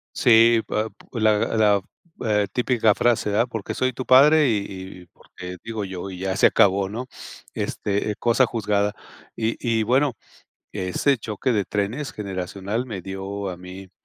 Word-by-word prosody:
Sí, 115 -1 +5
pa 110 +1 -1 0.3
la 110 -2 +2 0.2
la, 105 -2 +4 0.4
eh, 105 -2 +2
típica 120 -3 +2
frase: 110 -4 +1
"Ah, 115 - +4
porque 115 -5 -5
soy 130 0 0
tu 130 - -6
padre 145 +2 +6
y 110 - +2
y 95 -1 -9
y - - -20
porque 90 +1 -11
digo 110 -3 -4
yo, 95 0 -6
y 90 - -8
ya 95 0 -2
se - - +6
acabó", 95 0 +3
¿no? 120 +5 -5 0.5
Este, 100 +1 -2
eh, - - -5
cosa 120 +2 +3
juzgada. 105 -3 0 0.4
Y 110 0 -1
y 115 -2 0
bueno, 130 +3 +2 0.6
ese 100 +8 0
choque 110 +3 -2
de 105 -3 +1
trenes 105 +10 -3
generacional 100 +3 -4
me 100 -7 -6
dio 95 +1 -5
a 90 - -6
mí, 90 +1 -10
105 Hz, 165 wpm, -23 LUFS, 95-120 Hz, 0.6 s, padre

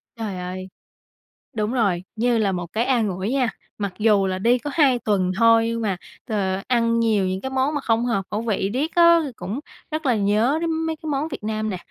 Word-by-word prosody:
Trời 215 -5 -4
ơi. 185 +1 -6 0.8
Đúng 215 +2 -1
rồi, 195 -8 +1
như 235 +1 +2
là 205 -3 +2
một 175 -2 -5
cái 230 +3 +1
an 235 -6 +2
ủi 190 +3 -3
nha. 260 -4 +1 0.3
Mặc 200 -3 -3
dù 210 -3 +4
là 185 0 -2
đi 235 +5 +3
có 270 +4 -5
2 270 -6 +4
tuần 190 -5 +1
thôi 230 0 +5
nhưng 230 0 -2
mà, 195 -5 -1 0.3
ờ, 195 -4 -1
ăn 230 -2 +2
nhiều 220 -4 +2
những 185 +1 -2
cái 265 - -4
món 265 +3 0
mà 290 - -1
không 230 -1 +1
hợp 215 -6 0
khẩu 210 +2 -1
vị 205 -4 -1
riết 295 +6 -2
á 340 -1 +7
thì 275 - -5
cũng 195 +9 -5 0.3
rất 310 -1 -3
là 250 - +3
nhớ 215 +7 +2
đến 335 - 0
mấy 320 0 -1
cái 315 - -10
món 285 +2 -1
Việt 315 - -7
Nam 215 0 -2
nè. 190 - -3
225 Hz, 230 wpm, -23 LUFS, 195-255 Hz, 0.8 s, á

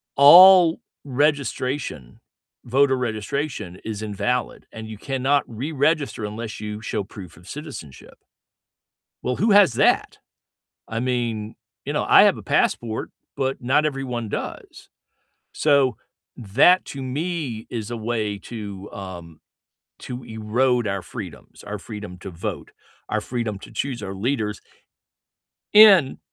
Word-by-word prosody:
all 175 +4 +8 0.2
registration, 135 - -2 0.4
voter 135 +2 +2
registration 115 - -4
is 110 -1 -5
invalid, 110 +4 -2
and 110 0 -8
you 110 -2 -8
cannot 135 +2 0
reregister 140 0 -1
unless 110 +1 -6
you 105 0 -6
show 105 -1 -3
proof 95 -4 -11
of 90 - -17
citizenship 140 - -9 1.1
Well, 125 - -1
who 215 +1 +2
has 195 - +6
that? - - +2 0.7
I 115 0 -3
mean, 120 -4 -2 0.3
you - - -4
know, - - 0
I - - +8
have - - +4
a - - -10
passport, 110 -2 0 0.3
but 135 0 -1
not 135 +5 +2
everyone 125 -6 -4
does. - - -7 0.7
So, 140 -5 +3 0.4
that 130 - +4
to 135 -1 -7
me 140 -4 -4
is 115 -1 -5
a 120 - -3
way 110 -3 -2
to, 100 -3 -8
um 85 -5 -9 0.6
to 125 0 -7
erode 115 +3 0
our 100 -1 -2
freedoms, 85 - -10
our 105 0 -5
freedom 105 -3 -9
to 95 - -9
vote, 90 -1 -6 0.4
our - - 0
freedom 115 -5 -3
to - - -13
choose 130 -6 -4
our 95 0 -5
leaders 105 0 -2 1.1
in 200 -10 +7
120 Hz, 130 wpm, -23 LUFS, 105-140 Hz, 1.1 s, all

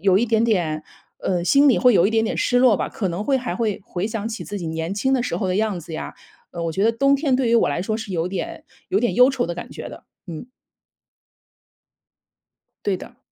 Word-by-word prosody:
有 190 -2 +4
一 225 - +3
点 225 -1 +2
点 170 -9 0 0.4
呃， 175 -2 -1
心 280 +8 +5
里 250 - +5
会 250 -2 +5
有 190 -1 +5
一 - - 0
点 225 0 +2
点 - - -2
失 245 - +2
落 245 -6 +5
吧， - - -2
可 195 -4 -3
能 175 +4 -3
会 270 +4 +2
还 245 -8 -3
会 210 -2 -2
回 180 +3 -3
想 225 -1 -4
起 230 0 -5
自 205 0 -5
己 170 - -5
年 160 +3 -3
轻 265 +6 0
的 255 - +2
时 250 - -2
候 195 - -2
的 185 +1 0
样 210 -4 0
子 165 0 -10
呀。 - - -5 0.4
呃， 170 -1 -5
我 165 - -2
觉 190 +4 -1
得 225 - +5
冬 275 +4 +3
天 275 -3 +1
对 255 -3 +1
于 235 - +3
我 230 - +4
来 170 +5 -1
说 215 - -2
是 215 -3 -7
有 170 -1 -1
点 190 +1 -5 0.2
有 380 - +2
点 240 - 0
忧 250 +2 +7
愁 265 -2 0
的 170 - -3
感 175 - -8
觉 - - -8
的， - - -12 0.2
嗯。 170 +9 -8 2.4
对 195 -2 +1
的。 - - -12
210 Hz, 265 characters per minute, -22 LUFS, 180-245 Hz, 2.4 s, 忧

